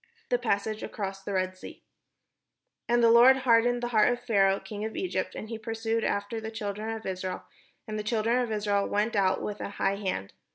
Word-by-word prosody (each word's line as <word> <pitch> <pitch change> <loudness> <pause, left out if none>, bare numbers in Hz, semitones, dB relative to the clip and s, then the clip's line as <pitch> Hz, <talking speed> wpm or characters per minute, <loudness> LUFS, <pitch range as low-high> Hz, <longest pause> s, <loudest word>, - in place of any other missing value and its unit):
THE - - +2
PASSAGE 215 - -1
ACROSS 195 -2 -5
THE 200 +1 -5
RED 185 0 0
SEA 185 - -11 1.1
And 240 0 +3
the 230 - +6
Lord 245 +3 +8
hardened 240 0 +4
the 240 - -1
heart 220 0 +4
of 245 - -2
Pharaoh 200 -5 +2
king 210 -1 -7
of 220 0 -4
Egypt, 375 - -2
and 215 - -6
he 225 0 -6
pursued 225 0 -2
after 205 +3 -2
the 220 - -5
children 215 0 -4
of 225 -1 -5
Israel; 185 -1 -4 0.4
and 215 0 -3
the - - -3
children 225 +2 +1
of 240 -2 -2
Israel 205 -2 0
went 210 +3 0
out 190 -2 +2
with 210 0 -4
an - - -4
high 195 0 0
hand. 185 - -3
215 Hz, 205 wpm, -28 LUFS, 200-230 Hz, 1.1 s, Lord